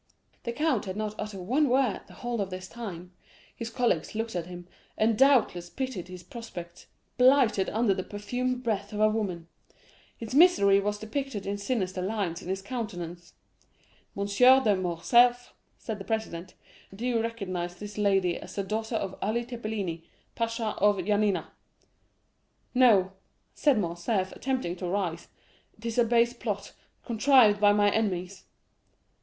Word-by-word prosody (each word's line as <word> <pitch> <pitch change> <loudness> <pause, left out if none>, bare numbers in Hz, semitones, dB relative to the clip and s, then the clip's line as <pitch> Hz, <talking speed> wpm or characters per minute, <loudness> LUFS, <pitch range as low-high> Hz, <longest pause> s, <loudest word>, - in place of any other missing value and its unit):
"The 235 - -1
count 280 -3 0
had 190 0 -5
not 215 -1 -2
uttered 210 -3 -5
one 265 +10 +2
word 255 -3 +2
the - - -15
whole 240 -3 -3
of 195 - -2
this 185 0 -7
time. 185 -6 -8 0.4
His 230 -1 -5
colleagues 225 -8 0
looked 225 -2 -3
at 175 -1 -3
him, 175 -1 -9 0.3
and 220 +1 +3
doubtless 240 -10 +3
pitied 255 -9 -4
his 180 -1 -10
prospects, 175 -5 -9 0.3
blighted 250 -6 +4
under 220 -2 +2
the 185 - -3
perfumed 250 +6 -3
breath 205 -3 -2
of 210 - -4
a 215 - +5
woman. 195 -6 -2 0.7
His 230 +1 -7
misery 270 - +6
was 205 +1 -1
depicted 220 0 -4
in 200 +1 -3
sinister 195 -4 -2
lines 190 -4 -2
on - - -10
his 190 0 -2
countenance. 175 -8 -6 0.8
'M. 200 - -1
de 250 +2 +5
Morcerf,' 235 +8 +3 0.2
said 220 -3 -6
the - - -6
president, 190 -5 -4 0.4
'do 225 +5 -5
you 240 -2 +1
recognize 185 -6 -4
this 205 +2 -8
lady 195 -4 +2
as - - -10
the 200 - -1
daughter 220 +3 -3
of 195 -3 -2
Ali 235 +3 -1
Tepelini, 215 -9 -4 0.3
pasha 230 -1 -2
of 205 0 +4
Yanina?'—'No,' 205 +2 -1 0.4
said 290 -5 +3
Morcerf, 185 +1 -1
attempting 255 -10 -2
to 180 - -4
rise, 175 -3 -2 0.5
'it 220 - -14
is 230 +1 -1
a - - +6
base 235 +1 +3
plot, - - -4 0.3
contrived 230 -3 +5
by 205 -1 +6
my 205 0 +3
enemies. 190 -4 -2
210 Hz, 150 wpm, -28 LUFS, 185-235 Hz, 0.8 s, misery